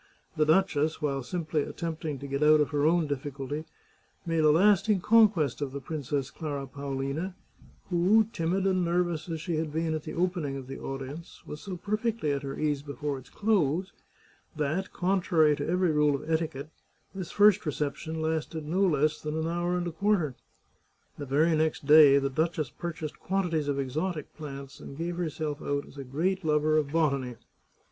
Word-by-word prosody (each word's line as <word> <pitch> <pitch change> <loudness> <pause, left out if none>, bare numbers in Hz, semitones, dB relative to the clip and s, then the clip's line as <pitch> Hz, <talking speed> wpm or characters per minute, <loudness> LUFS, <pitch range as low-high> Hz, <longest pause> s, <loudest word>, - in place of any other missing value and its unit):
The 155 -1 +2
duchess, 160 -3 +2
while 140 -2 -1
simply 155 +2 -2
attempting 160 -1 -4
to 140 +2 -7
get 140 +1 -2
out 155 0 +6
of 145 -3 +1
her 145 0 +2
own 170 0 +3
difficulty, 145 +1 -4 0.6
made 165 -2 +1
a 155 - +6
lasting 195 +4 +4
conquest 200 - +4
of 135 -2 -3
the 140 - -4
Princess 140 -1 -3
Clara 145 -4 -4
Paolina, 140 +6 -4 0.6
who, 185 +6 +5
timid 180 +3 0
and 185 -2 +2
nervous 175 -1 0
as 165 -1 -3
she 165 0 -2
had 155 -1 -2
been 160 +1 -1
at 155 - -2
the - - -7
opening 170 -6 -1
of 135 - -7
the 135 +1 -7
audience, 135 +5 -7
was 150 - -8
so 190 -3 -6
perfectly 215 -3 -1
at 140 -1 -1
her 135 -1 -5
ease 150 -2 0
before 145 0 -4
its 130 - -16
close 190 -4 +1 0.6
that, 155 +5 -1
contrary 175 -5 +2
to 145 +1 -4
every 180 -1 +2
rule 150 -1 +3
of 140 - -6
etiquette, 160 -2 -2 0.4
this 190 -3 -5
first 210 0 +5
reception 150 +2 -3
lasted 160 0 -2
no 175 +6 0
less 155 -4 +2
than 155 +1 -3
an 160 0 -1
hour 175 +1 0
and 175 - -2
a 175 - -3
quarter. 175 -5 +1 0.9
The 145 - -5
very 155 +5 +3
next 155 -2 0
day 150 -1 +8
the 140 0 +1
duchess 155 0 -1
purchased 160 -3 -6
quan 190 -2 -1
tities 155 -3 0
of 140 -1 0
exotic 150 +5 -3
plants, 140 -3 -8
and 140 - -10
gave 170 +1 -3
herself 155 -3 -3
out 145 0 -2
as 140 - -12
a - - -4
great 175 +9 -1
lover 155 0 +2
of 145 -2 -3
botany. 140 -6 0
155 Hz, 185 wpm, -28 LUFS, 145-175 Hz, 0.9 s, day